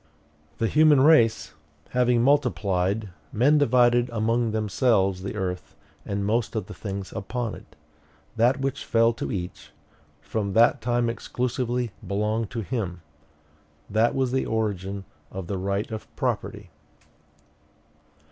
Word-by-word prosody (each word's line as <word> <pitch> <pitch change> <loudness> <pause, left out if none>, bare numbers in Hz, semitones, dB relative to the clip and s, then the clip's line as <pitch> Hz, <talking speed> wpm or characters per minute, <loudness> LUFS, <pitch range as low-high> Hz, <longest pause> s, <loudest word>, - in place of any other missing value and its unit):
"The 115 - 0
human 150 +2 +5
race 135 - +4 0.4
having 125 -1 +2
multiplied, 105 -7 +1 0.2
men 145 +7 +4
divided 120 -2 +4
among 115 +1 0
themselves 105 -3 +1
the 95 - -5
earth 90 -1 -4 0.3
and 100 0 -2
most 115 +2 0
of 110 -4 -2
the - - -9
things 100 -2 -6
upon 115 +2 -3
it; - - -13 0.6
that 120 +4 +3
which 135 -1 -2
fell 115 0 +3
to 115 - -5
each, 90 -3 -5 0.5
from 100 -3 -3
that 120 +4 +4
time 120 0 +1
exclusively 120 +1 -2 0.2
belonged 105 +2 -1
to 115 - -4
him. 95 -6 -4 0.9
That 110 +3 +2
was 130 -2 0
the 130 0 0
origin 100 -3 -2 0.2
of 95 -1 -6
the 95 +1 -3
right 100 +3 -2
of 110 - -6
property." - - -3
115 Hz, 130 wpm, -25 LUFS, 100-120 Hz, 0.9 s, human